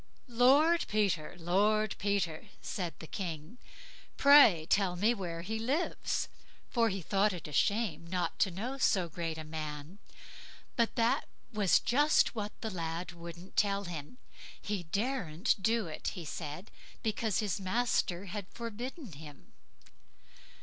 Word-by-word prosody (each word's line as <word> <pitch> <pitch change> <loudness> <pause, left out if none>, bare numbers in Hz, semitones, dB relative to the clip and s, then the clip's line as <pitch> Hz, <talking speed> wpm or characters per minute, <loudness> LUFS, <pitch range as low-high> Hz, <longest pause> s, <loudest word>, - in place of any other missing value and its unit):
"Lord 275 +8 +4
Peter! 200 -7 0
Lord 205 +5 +2
Peter!" 195 -3 -1
said 175 -4 -4
the - - -9
King. 165 +4 -6 0.6
"Pray 280 - +7
tell 195 -2 +2
me 210 +7 +3
where 170 -6 -5
he 220 +4 -3
lives"; 270 +10 -1 0.4
for 230 -2 +3
he 195 -2 -4
thought 200 +3 +2
it 175 -4 -7
a 150 - -9
shame 180 -2 +1
not 175 -1 -2
to 195 - +4
know 235 +10 -5
so 185 -8 +3
great 165 -1 -4
a 160 - -5
man. 155 +3 -6 0.8
But 235 -1 +1
that 235 +4 +2 0.3
was 205 -4 +4
just 290 +5 +3
what 210 -3 -3
the 220 - -3
lad 170 -1 -4
wouldn't 170 +2 -10
tell 200 -1 +2
him; 170 +3 -7 0.4
he 205 -2 -3
daren't 195 - 0
do 225 +1 +2
it, 160 - -6
he 170 - -6
said, 155 +4 -6 0.3
because 220 -3 0
his 205 -2 -1
master 195 -2 0
had 200 0 -5
forbidden 240 - -6
him. 150 -1 -12
195 Hz, 140 wpm, -32 LUFS, 170-225 Hz, 0.8 s, Pray